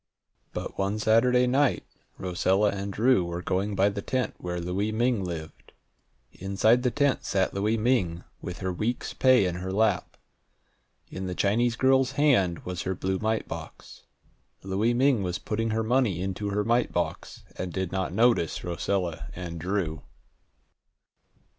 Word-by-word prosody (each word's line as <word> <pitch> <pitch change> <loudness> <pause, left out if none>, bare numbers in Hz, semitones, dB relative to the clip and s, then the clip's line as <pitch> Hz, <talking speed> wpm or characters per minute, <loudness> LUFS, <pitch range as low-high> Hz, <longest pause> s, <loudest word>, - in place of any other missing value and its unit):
But - - -6
one 100 +2 0
Saturday 120 +3 +4
night 130 +2 +2 0.3
Rosella 95 +3 +1
and 100 0 -4
Drew 115 0 +3
were 85 0 -5
going 100 +3 -1
by 100 +1 +4
the 100 0 -4
tent 130 +3 -1
where 90 0 -4
Louie 95 +5 -1
Ming 115 -1 +1
lived. 80 -3 -7 0.6
Inside 100 +6 +2
the 125 - +2
tent 140 +2 +1
sat 95 -2 0
Louie 105 +3 0
Ming, 105 -8 +1 0.2
with 90 +2 -7
her 95 -1 -1
week's 115 +7 -2
pay 130 -6 +4
in 90 -1 -2
her 95 +1 -4
lap. 110 +3 0 0.9
In 95 0 -5
the 90 - -4
Chinese 115 +5 +2
girl's 130 0 +3
hand 120 - +2
was 90 -1 -4
her 95 - -2
blue 95 +1 -2
mite 110 0 -1
box. - - -9 0.6
Louie 100 +5 +1
Ming 130 -3 +3
was 90 -2 -2
putting 115 +1 -2
her 110 +1 0
money 115 -6 +1
into 95 +2 -3
her 105 +1 0
mite 120 +2 +1
box, - - -3
and 90 -1 -4
did 95 0 -3
not 95 -2 -2
notice 110 -5 +2
Rosella 85 0 -2
and 85 -2 -6
Drew. 85 -3 -2
100 Hz, 155 wpm, -27 LUFS, 90-120 Hz, 0.9 s, Saturday